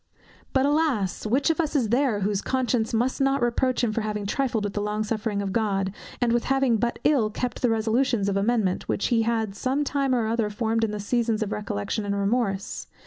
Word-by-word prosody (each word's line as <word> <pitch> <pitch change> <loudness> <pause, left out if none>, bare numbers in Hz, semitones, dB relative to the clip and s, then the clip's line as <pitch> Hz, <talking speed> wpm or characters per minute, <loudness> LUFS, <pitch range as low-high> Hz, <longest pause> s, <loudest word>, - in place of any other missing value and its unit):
But, 265 0 +2
alas! 285 - +1
which 270 +8 +2
of 325 - -3
us 310 -1 -3
is 245 -7 +2
there, 240 -3 +2
whose 200 0 0
conscience 250 -3 0
must 245 +5 0
not 270 0 +2
reproach 245 +1 +1
him 230 - +2
with 215 - -8
having 210 -1 -3
trifled 235 0 0
with 205 -1 -3
the 205 - -2
long 210 +1 -1
suffering 215 -1 -2
of 195 -1 -3
God, 195 -4 0 0.3
and 240 -2 +2
with 240 - +1
having 270 -3 +2
but 235 +2 -1
ill 260 -8 +3
kept 245 +3 -4
the 245 - +3
resolutions 225 0 +1
of 200 - 0
amendment, 200 -2 0
which 200 - 0
he 235 -2 +3
had 225 -2 0
some 260 +8 -1
time 275 -2 0
or 235 -2 +1
other 225 -1 0
formed 225 +1 -1
in 225 - +1
the 210 0 -4
seasons 225 +1 0
of 210 - -5
recollection 205 - -3
and 200 0 -1
remorse? 200 -1 -1
225 Hz, 215 wpm, -25 LUFS, 210-255 Hz, 0.3 s, ill